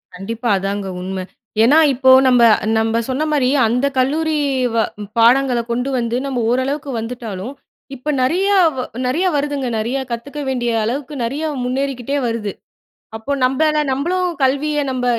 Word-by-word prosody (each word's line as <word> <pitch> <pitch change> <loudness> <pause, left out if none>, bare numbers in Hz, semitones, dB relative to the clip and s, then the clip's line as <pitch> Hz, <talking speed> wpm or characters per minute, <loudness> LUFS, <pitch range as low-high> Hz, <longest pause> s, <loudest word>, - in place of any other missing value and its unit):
கண்டிப்பா. 225 +5 -4
அதாங்க 195 +1 -3
உண்ம. 185 0 -4 0.4
ஏன்னா, 275 +7 +5 0.2
இப்போ 260 +1 +2 0.2
நம்ப, 245 -2 +5 0.3
நம்ப 225 +1 +1
சொன்னமாரி 290 -1 +1 0.2
அந்த 250 +4 0
கல்லூரி 310 +4 +1 0.4
வ - - +1 0.4
பாடங்கள 250 +1 +4
கொண்டு 245 +3 -1
வந்து 235 +1 -1
நம்ம 255 -3 -2
ஓரளவுக்கு 275 +3 -1
வந்துட்டாலும் 225 -1 -6 0.4
இப்ப 270 +4 -6
நிறையா 380 +9 +2 0.5
நிறையா 320 +9 +1
வருதுங்க. 285 -2 -1
நிறையா 245 +5 -2
கத்துக்க 280 +6 -5
வேண்டிய 240 -2 -1
அளவுக்கு 275 +5 -3
நிறையா 290 +7 -3 0.2
முன்னேறிக்கிட்டே 270 +1 -2
வருது. 230 -3 -2 0.7
அப்போ 225 +6 -4
நம்மள 300 +4 +2
நம்மளும் 350 +7 0
கல்விய 285 +3 +1
நம்ப 255 -1 -2
255 Hz, 130 wpm, -18 LUFS, 235-285 Hz, 0.7 s, ஏன்னா